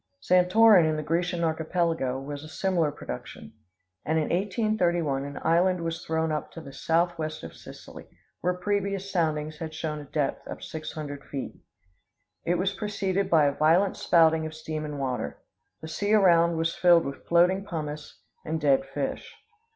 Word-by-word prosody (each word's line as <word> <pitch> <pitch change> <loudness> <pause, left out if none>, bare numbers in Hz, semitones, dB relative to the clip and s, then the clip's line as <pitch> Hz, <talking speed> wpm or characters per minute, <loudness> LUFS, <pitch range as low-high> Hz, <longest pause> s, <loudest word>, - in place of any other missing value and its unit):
Santorin 180 - +5
in 155 - 0
the 155 - -3
Grecian 170 +2 -1
Archipelago 160 -5 -1
is 145 0 -6
a - - -9
similar 170 -2 0
production. 65 - -8 0.5
And 160 +1 0
in 155 - 0
1831 175 -7 0
an 145 0 -7
island 180 +2 +2
was 165 +1 -4
thrown 160 0 -1
up 150 - -3
to - - -8
the 140 -4 -11
southwest 165 -1 -1
of 80 - -9
Sicily, - - -12 0.3
where 180 +1 0
previous 195 +1 -2
soundings 155 -3 -1
had 160 -1 -6
shown 155 -1 -3
a 145 - -9
depth 145 0 -2
of - - -8
six 155 -1 -6
hundred 145 -3 -6
feet. 135 -2 -5 0.9
It 175 - +1
was 190 +2 0
preceded 200 -1 -2
by 155 -3 +5
a 140 - +3
violent 170 +7 +3
spouting 160 -1 +3
of 155 - -9
steam 155 -1 -5
and 150 -1 -5
water. 125 - -3 0.4
The 160 - -7
sea 205 +7 +1
around 170 -4 +4
was 165 0 0
filled 175 -2 +4
with 140 0 -7
floating 180 +3 +3
pumice 155 -5 -6 0.2
and 160 +1 -2
dead 140 -3 +2
fish. - - -4
165 Hz, 165 wpm, -27 LUFS, 150-180 Hz, 0.9 s, Santorin